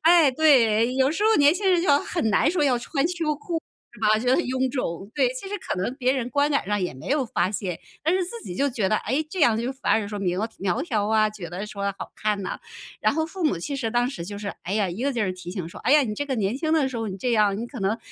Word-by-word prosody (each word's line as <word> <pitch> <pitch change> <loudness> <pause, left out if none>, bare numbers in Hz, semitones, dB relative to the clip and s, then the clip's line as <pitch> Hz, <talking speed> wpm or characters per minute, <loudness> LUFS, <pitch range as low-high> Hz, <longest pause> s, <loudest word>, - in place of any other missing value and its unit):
哎， 330 -3 +6
对。 250 -5 +4
有 265 +1 +3
时 355 +6 -2
候 445 0 +5
年 290 +3 +6
轻 385 0 +1
人 355 - +4
就 - - -1
很 310 -10 -1
难 245 +8 +3
说 330 -4 +1
要 250 -3 +3
穿 275 +4 -1
秋 330 -4 -1
裤 325 +2 -4 0.3
是 - - -15
吧？ 215 0 +4
觉 245 - -5
得 - - +3
臃 260 -2 0
肿， 195 -6 -4
对。 265 -4 +3
其 255 +10 -7
实 - - -8
可 185 - -3
能 215 +7 -2
别 255 -2 +2
人 250 -2 -2
观 285 +1 +2
感 280 - +1
上 205 0 0
也 180 -6 -2
没 130 - -9
有 275 -2 +1
发 180 -4 0
现， 190 -5 -3 0.2
但 320 +3 +2
是 370 -1 +1
自 460 +6 -7
己 175 - -7
就 280 0 +1
觉 215 -6 0
得， 215 - +2
诶， 265 +8 -1
这 365 +1 -5
样 230 -6 +4
就 245 +3 -2
反 270 0 -1
而 215 -2 +1
说 205 -1 -5
明 180 -2 -1
苗 220 +3 -1
苗 195 +8 -1
条 215 -10 -1
啊， 215 -1 +3
觉 195 -6 -8
得 185 +4 -5
说 200 -1 -5
好 - - -7
看 210 -1 0
呐。 185 - -4 0.4
然 - - +3
后 320 +1 0
父 365 +1 -5
母 295 - +2
其 275 - -4
实 230 -4 -2
当 240 +1 +1
时 170 -11 -6
就 205 +2 -6
是， 205 -1 -5
哎 180 - -4
呀， 205 -2 +1
一 180 +7 -5
个 280 +1 +1
劲 235 - -1
儿 195 - 0
提 180 -1 -8
醒 180 -3 -5
说： - - -11
“哎 270 - +4
呀， 300 - +7
你 210 - -3
这 285 - -2
个 270 -2 -2
年 210 +2 0
轻 315 +2 -1
的 305 -4 +3
时 260 - -6
候 225 -1 -2
你 190 0 -6
这 245 +4 0
样， 210 -3 +3
你 235 - -4
可 245 -2 -9
能， 200 +4 0
245 Hz, 320 characters per minute, -24 LUFS, 205-290 Hz, 0.4 s, 呀